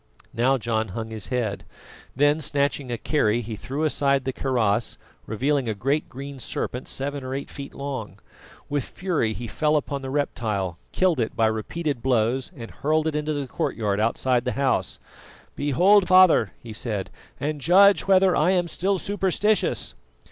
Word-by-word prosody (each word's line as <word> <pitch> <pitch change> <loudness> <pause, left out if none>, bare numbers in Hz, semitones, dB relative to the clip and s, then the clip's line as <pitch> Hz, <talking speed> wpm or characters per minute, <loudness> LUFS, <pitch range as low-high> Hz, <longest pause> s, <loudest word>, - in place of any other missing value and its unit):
Now 130 +3 +2
John 110 -2 -1
hung 110 0 -5
his 110 -2 -4
head; 120 -6 -2 0.5
then 145 +3 +3
snatching 140 -2 -1
a 120 - -1
kerry, 120 -4 +1
he 110 -1 -6
threw 135 +8 -4
aside 140 -3 +1
the 130 - -1
kaross, 120 -5 0 0.3
revealing 130 +3 0
a 110 - -2
great 135 +9 -1
green 140 +1 -8
serpent 125 +1 -4
seven 140 0 -3
or 130 +1 -4
eight 140 - -6
feet 140 -1 -8
long. 130 -8 -5 0.5
With 145 -2 -1
fury 165 -12 -1
he 120 - -6
fell 150 +7 0
upon 140 -1 -1
the 135 - -5
reptile, 105 - -2
killed 185 -6 +2
it 115 - -1
by 115 - +3
repeated 120 +6 -2
blows, 125 +2 +1
and 115 -2 -8
hurled 155 +2 0
it 160 -1 -1
into 150 +1 -1
the 145 -2 -2
courtyard 105 -5 -2
outside 120 +2 +1
the 125 - -2
house. 130 -10 0 0.6
"Behold, 180 +8 +4
father," 185 - +6
he 115 -2 -8
said, 105 -3 -3 0.3
"and 150 0 -3
judge 195 +7 +5
whether 190 -1 +5
I 155 +4 +3
am 180 -2 +2
still 190 +3 0
superstitious." 205 +2 0
135 Hz, 165 wpm, -24 LUFS, 115-155 Hz, 0.6 s, father